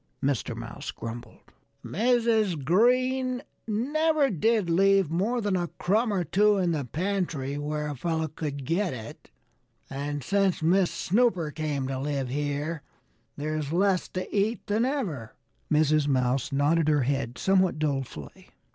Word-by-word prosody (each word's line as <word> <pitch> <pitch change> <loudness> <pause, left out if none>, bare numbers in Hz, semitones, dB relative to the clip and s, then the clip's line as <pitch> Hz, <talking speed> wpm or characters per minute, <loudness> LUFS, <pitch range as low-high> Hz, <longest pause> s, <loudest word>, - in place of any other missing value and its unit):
Mr. 135 -4 0
Mouse 115 0 -7
grumbled. 115 0 -8 0.3
"Mrs. 220 - +1
Green 255 - +2 0.2
never 290 +6 +1
did 215 +2 +1
leave 195 0 +3
more 215 +8 0
than 205 -3 0
a 175 -1 0
crumb 215 +5 +1
or 190 -3 0
two 205 +5 +3
in 180 -3 +1
the 150 -5 -1
pantry 165 - -2
where 150 +1 -2
a 145 - -4
fellow 160 +3 -1
could 145 -3 -5
get 170 0 0
it. 135 +8 -10 0.6
And 145 +1 -3
since 195 +1 +1
Miss 180 +2 +3
Snooper 185 -6 +1
came 145 -4 -2
to 135 -1 -3
live 140 -2 -2
here 145 +3 -2 0.6
there's 155 0 -3
less 185 +1 +2
to 185 - -2
eat 210 +3 0
than 215 +3 +1
ever." 185 - -3 0.4
Mrs. 155 -1 +3
Mouse 130 0 +1
nodded 145 +3 +2
her 150 -3 +3
head 130 -2 -2
somewhat 190 0 +2
dolefully. 135 - -4
165 Hz, 140 wpm, -27 LUFS, 145-200 Hz, 0.6 s, leave